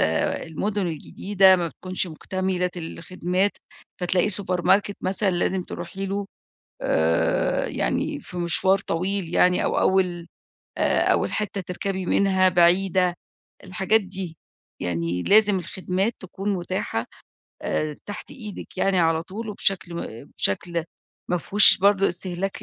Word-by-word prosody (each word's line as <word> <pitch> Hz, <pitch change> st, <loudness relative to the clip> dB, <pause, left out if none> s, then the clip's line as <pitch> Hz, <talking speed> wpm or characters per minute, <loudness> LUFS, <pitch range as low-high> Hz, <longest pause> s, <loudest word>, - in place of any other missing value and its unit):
آآ 80 Hz, 0 st, +1 dB
المُدن 195 Hz, +5 st, -2 dB
الجديدة 190 Hz, +4 st, +3 dB
ما 170 Hz, -2 st, -1 dB
بتكونش 185 Hz, +3 st, -3 dB
مُكتملة 180 Hz, +2 st, -2 dB
الخدمات، 180 Hz, +3 st, -2 dB, 0.5 s
فتلاقي 180 Hz, +2 st, +2 dB
سوبر 185 Hz, -3 st, +1 dB
ماركت 200 Hz, +2 st, +2 dB
مثلًا 195 Hz, +1 st, 0 dB
لازم 185 Hz, +1 st, 0 dB
تروحي 190 Hz, +2 st, -6 dB
له، 200 Hz, +1 st, -3 dB, 0.6 s
آآ 80 Hz, +1 st, +1 dB
يعني -, -, -1 dB
في 180 Hz, -, -10 dB
مشوار 180 Hz, +3 st, +2 dB
طويل 185 Hz, +1 st, -1 dB
يعني، 180 Hz, +1 st, +3 dB
أو -, -, 0 dB
أول 180 Hz, -3 st, +1 dB, 0.5 s
آآ، -, -, +2 dB
أول -, -, 0 dB
حِتّة 210 Hz, -2 st, -2 dB
تركبي 185 Hz, +1 st, -4 dB
منها 190 Hz, -1 st, +3 dB
بعيدة، 180 Hz, +1 st, +3 dB, 0.5 s
الحاجات 190 Hz, +4 st, +2 dB
دي، 190 Hz, -4 st, -6 dB, 0.4 s
يعني 85 Hz, 0 st, -2 dB
لازم 210 Hz, -, +5 dB
الخدمات 185 Hz, +4 st, -2 dB
تكون 195 Hz, +2 st, -4 dB
مُتاحة 175 Hz, -10 st, -3 dB, 0.6 s
آآ 155 Hz, -1 st, -1 dB
تحت 205 Hz, -, -7 dB
إيدك 210 Hz, -5 st, -9 dB
يعني 195 Hz, 0 st, +2 dB
على 165 Hz, -1 st, +2 dB
طول، 215 Hz, +6 st, -7 dB
وبشكل 195 Hz, -3 st, -1 dB
ما 140 Hz, -5 st, -7 dB
بشكل 170 Hz, -, 0 dB, 0.5 s
مافيهوش 190 Hz, +4 st, +6 dB
برضه 195 Hz, 0 st, +4 dB
استهلاك 180 Hz, +2 st, -4 dB
185 Hz, 125 wpm, -24 LUFS, 175-195 Hz, 0.6 s, مافيهوش